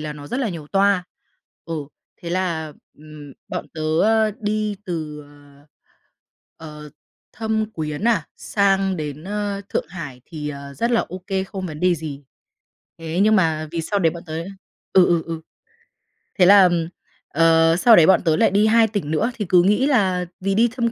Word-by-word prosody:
là 150 -1 -5
nó 145 -1 -10
rất 250 - -3
là 235 - 0
nhiều 160 -5 -7
toa. 195 0 +2 0.6
Ừ, 165 - -5 0.5
thế 170 - -5
là, 170 -4 -2 0.3
ừm, 150 -2 -12 0.2
bọn 150 - -5
tớ, 155 - -5 0.2
ơ, 220 0 +3
đi 210 -1 -1
từ, 155 -5 -5
ờ, 145 0 -20 1.2
ờ, 150 - -11 0.4
Thâm 220 -1 -2
Quyến 155 +4 -4
à, 195 -10 +1
sang 195 -2 +1
đến, 150 0 -6
ơ, 205 0 -3
Thượng - - -2
Hải 150 -8 -8
thì, 150 -2 -6
ờ, 140 -1 -8
rất 235 - -1
là 235 - +3
ô 185 - -6
kê, 190 -1 -1
không 190 -1 -6
vấn 155 -2 -8
đề 180 -1 +3
gì. 145 -3 -7 0.7
Thế 165 +1 -4
nhưng 215 +1 +4
mà 160 -4 +1
vì 165 -1 -2
sau 200 +5 -1
đấy 165 -3 +3
bọn 170 0 -9
tớ 155 - -8 0.6
ừ, 185 -2 +6
ừ, 170 -2 +2
ừ. 165 -1 -5 1.0
Thế 180 - +7
là, 200 +1 +8
ờm, 175 -2 +2 0.4
ờ, 165 +1 +4
sau 225 +6 +6
đấy 160 - +7
bọn 190 - +5
tớ 160 -2 +3
lại - - +3
đi 210 +2 +3
2 225 0 +4
tỉnh 200 -8 -4
nữa 160 +11 0
thì 210 - -3
cứ 180 -1 +5
nghĩ 210 +8 +2
là 190 -9 +1
vì 195 +1 -1
đi 235 +2 +4
Thâm 235 -2 0
175 Hz, 190 wpm, -21 LUFS, 155-205 Hz, 1.2 s, là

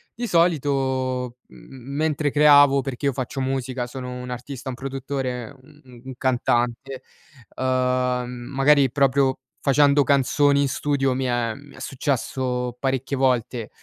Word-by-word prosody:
Di 240 - -4
solito 130 - 0
m - - -19
m 135 +1 -11
mentre 150 -1 0
creavo 145 -2 +6
perché 135 +1 -5
io 140 - +1
faccio 130 +2 -4
musica 130 -1 -2
sono 125 0 -7
un 125 0 -7
artista, 125 +2 -7
un 125 - -4
produttore, 135 -2 -4
un 150 +2 -20
u - - -19
u - - -16
un 130 - -7
cantante, 125 +1 -1 0.5
uhm, 125 -1 0 0.3
magari 135 0 +4
proprio 135 -1 +2 0.2
facendo 140 +1 +4
canzoni 140 +1 +3
in 140 - +1
studio 135 -1 0
mi 130 +1 -2
è 120 -2 0
mi 145 +1 -15
è - - -13
successo 125 -2 -2
parecchie 135 0 -1
volte, 125 -3 0
130 Hz, 150 wpm, -23 LUFS, 125-140 Hz, 0.5 s, creavo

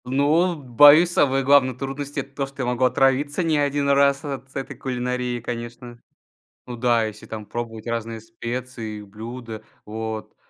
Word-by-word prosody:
Ну, 150 +7 +2
боюсь, 145 +5 +6
самые 135 -4 +2
главные 135 -2 +4
трудности- 140 +2 -5
это 135 +1 -14
то, 140 - -1
что 135 -1 -6
я - - -1
могу 125 +1 +1
отравиться 135 +6 +2
не 160 -3 +1
один 145 0 0
раз 140 0 +3
от 135 -2 -7
этой 135 - -5
кулинарии, 125 -1 -3
конечно. 120 0 -7 0.7
Ну 125 - -6
да, 120 -1 +2
если 110 0 -8
там 105 -2 -8
пробовать 115 -1 -6
разные 115 -1 -3
специи, 115 -1 -6
блюда, 110 +2 -8 0.2
вот, 110 0 -5
125 Hz, 155 wpm, -23 LUFS, 115-140 Hz, 0.7 s, боюсь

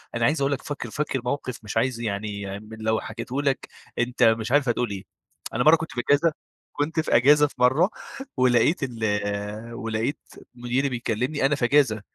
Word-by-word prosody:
أنا 115 0 +1
عايز 150 +3 +2
أقول 140 +1 +2
لك 140 - -1
فاكر 145 -5 -5
فاكر 140 -1 -2
موقف، 130 -1 -3
مش 105 +1 -4
عايز 125 0 +1
يعني 100 -2 -4
م 105 +1 -14
لو 110 0 0
حكيته 115 +5 -4
لك 140 -2 -1 0.3
أنت 120 +1 +1
مش 115 0 +3
عارف 140 -2 +3
هتقول 120 0 0
إيه، 95 -1 -5 0.5
أنا 125 - +1
مرة 155 +4 +8
كنت 160 0 -5
في 120 - -2
أجازة 150 +3 +4 0.4
كنت 155 +3 -1
في 160 - +1
إجازة 145 +5 +6
في - - -16
مرة 130 +9 +4 0.5
ولقيت 130 +6 +3
ال 125 -4 -4 0.7
ولقيت 115 +3 -2 0.4
مديري 125 +3 0
بيكلمني 125 +4 -1
أنا 145 +2 +3
في 135 - 0
أجازة، 120 -5 +3
125 Hz, 185 wpm, -25 LUFS, 115-145 Hz, 0.7 s, مرة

